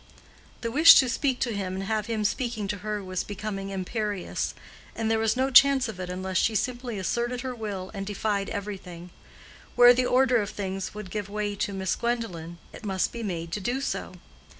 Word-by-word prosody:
The 230 -1 -2
wish 310 +6 +9
to 265 - +6
speak 260 +1 0
to 240 -3 0
him 190 -2 -3
and 190 - -3
have 215 +1 -1
him 220 -2 -1
speaking 230 -2 -1
to 205 - -2
her 210 0 -3
was 185 -1 -3
becoming 200 -1 -5
imperious; 195 +1 -3 0.4
and 225 -1 -1
there 225 - +2
was 225 +2 +1
no 265 +1 +1
chance 270 0 +7
of 215 -4 -7
it 180 -1 -5
unless 185 +1 -3
she 220 - +2
simply 240 0 -2
asserted 240 +6 -1
her 260 -1 -4
will 205 -5 -5
and 195 -2 -4
defied 205 0 -2
everything. 185 -4 -6 0.6
Where 245 0 +9
the 250 0 +1
order 255 -1 +4
of 210 -2 -1
things 190 -2 -4
could 210 -3 -9
give 205 -2 -4
way 205 0 -2
to 205 - -1
Miss 190 -2 -1
Gwendolen, 185 -9 -3 0.2
it - - -11
must 190 -3 0
be 235 - -6
made 170 -6 -4
to 210 - -2
do 245 +7 -1
so. 275 - -3
210 Hz, 200 wpm, -27 LUFS, 190-240 Hz, 0.6 s, wish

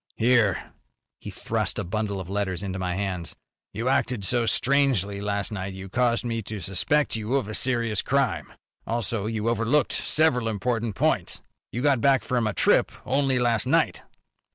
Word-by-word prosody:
"Here." 115 -5 +2 0.5
He - - -8
thrust - - -2
a - - -1
bundle 100 +1 -2
of 95 - -6
letters 95 -2 -2
into 95 -1 -4
my 90 -1 -2
hands. 95 -4 -3 0.4
"You 115 +5 -3
acted 125 -4 +1
so 120 +3 +2
strangely 120 -9 +2
last 100 0 -1
night 95 -2 -4
you 95 0 -8
caused 120 +2 +1
me 115 -1 -2
to 105 0 -6
suspect 145 +12 0
you 110 +4 -2
of 135 -7 0
a 110 - -5
serious 115 -4 0
crime. 130 - 0 0.4
Also, 115 -2 -1
you 110 0 -2
overlooked 120 +4 +2
several 140 -7 +2
important 115 0 -2
points. - - 0 0.3
You 120 - -3
got 140 -5 +3
back 135 +1 +4
from 120 -3 0
a 105 - -1
trip - - +3
only 135 0 +1
last 120 -3 +1
night." - - +2
115 Hz, 170 wpm, -25 LUFS, 100-125 Hz, 0.5 s, back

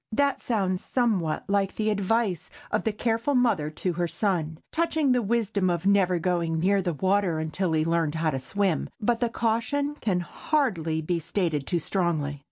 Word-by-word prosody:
That 280 +4 +1
sounds 190 -6 -1
somewhat 205 -11 0
like 200 -1 +1
the 215 0 0
advice 205 -3 0 0.2
of 215 - 0
the 220 - +2
careful 230 +5 0
mother 230 -12 +2
to 175 +4 -2
her 175 +1 -1
son, 165 -5 -1
touching 320 -4 +1
the 250 -1 +3
wisdom 210 -3 0
of 175 0 -1
never 195 -3 +3
going 170 -1 0
near 195 +3 +3
the 175 -3 -2
water 190 0 +1
until 160 +3 -1
he 155 0 +2
learned 165 -2 +1
how 160 -1 +1
to 135 - -2
swim—but 200 - -1
the 240 - +1
caution 240 +6 0
can 195 -11 -1
hardly 170 - -1
be 170 +2 0
stated 160 -5 -1
too 175 - +1
strongly. 160 -5 -1
190 Hz, 175 wpm, -26 LUFS, 165-225 Hz, 0.2 s, the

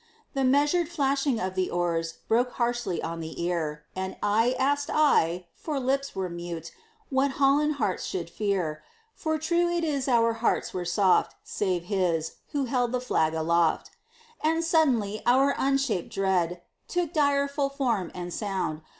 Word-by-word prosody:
The 270 -2 0
measured 290 +6 +3
flashing 275 -5 +1
of 185 0 -2
the 185 -1 0
oars 165 -2 -1
Broke 245 +2 +2
harshly 240 -6 -1
on 165 0 -4
the 160 -1 -7
ear; 160 -4 -2
And 190 0 -3
eye 225 +5 +3
asked 285 +2 +1
eye 180 - +3
for 300 -3 -4
lips 275 +2 -1
were 190 -1 -1
mute 170 -1 -6 0.4
What 270 +1 +2
Holland 290 +2 +3
hearts 210 -9 -1
should 175 -3 -3
fear; 175 -5 -2 0.3
For 315 0 -1
true 340 +3 +1
it 345 -1 0
is 280 -4 -1
our 230 -2 +3
hearts 230 +1 0
were 180 -1 -3
soft, 185 +2 +2
Save 185 -4 -1
his, 175 -4 -1
who 285 -2 0
held 245 -1 0
the 250 - +1
flag 160 -10 +1
aloft. 165 0 +1 0.5
And 325 +2 +2
suddenly 255 -11 +2
our 270 +3 +5
unshaped 275 -8 0
dread 180 -4 0 0.2
Took 350 -2 -1
direful 280 -2 +2
form 245 - -1
and 175 -1 -5
sound. 190 -7 -2
230 Hz, 155 wpm, -27 LUFS, 175-280 Hz, 0.5 s, our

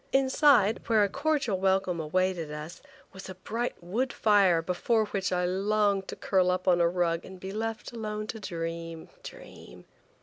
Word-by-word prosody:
Inside, 265 -4 +4
where 220 -2 +4
a 200 - +1
cordial 275 -5 0
welcome 190 -2 +1
awaited 170 0 -1
us, 150 +3 -8 0.3
was 190 0 -10
a 185 - -7
bright 230 +6 -3
wood 230 +9 -1
fire 200 -5 +4
before 215 +6 +1
which 195 -3 -2
I 180 0 +1
longed 200 +1 +1
to - - -6
curl 185 -2 +1
up 185 +1 -1
on 175 -1 +4
a 170 - +4
rug 170 -1 0
and 190 -1 -11
be 190 +1 -6
left 225 +2 -4
alone 215 -2 -4
to 220 +1 -6
dream–dream. 165 -3 -8
190 Hz, 165 wpm, -28 LUFS, 180-220 Hz, 0.3 s, Inside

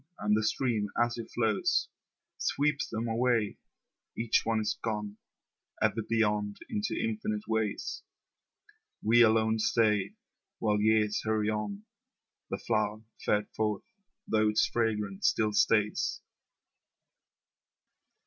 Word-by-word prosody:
And 105 0 +2
the 110 - +2
stream 110 -1 0
as 120 0 +1
it 115 - -7
flows 110 -3 +1 0.5
Sweeps 145 +1 0
them 115 +1 -3
away, 115 -2 +1 0.6
Each 115 -1 +2
one 115 -1 +1
is 105 - -2
gone 105 -2 -3 0.6
Ever 110 +1 +1
beyond 105 -2 0
into 215 0 -2
infinite 215 -1 -2
ways. 110 -2 -2 1.0
We 115 +3 +5
alone 110 -1 +4
stay 110 -2 +2 0.4
While 105 -1 +1
years 105 -1 +3
hurry 110 -1 +1
on, 105 -1 -4 0.7
The - - -2
flower 110 -1 -1 0.2
fared 105 0 +1
forth, 105 -2 -1 0.4
though 110 -1 +3
its 105 - +3
fragrance 105 -4 0
still 110 -1 +2
stays. 105 0 +2
110 Hz, 110 wpm, -30 LUFS, 105-115 Hz, 1.0 s, We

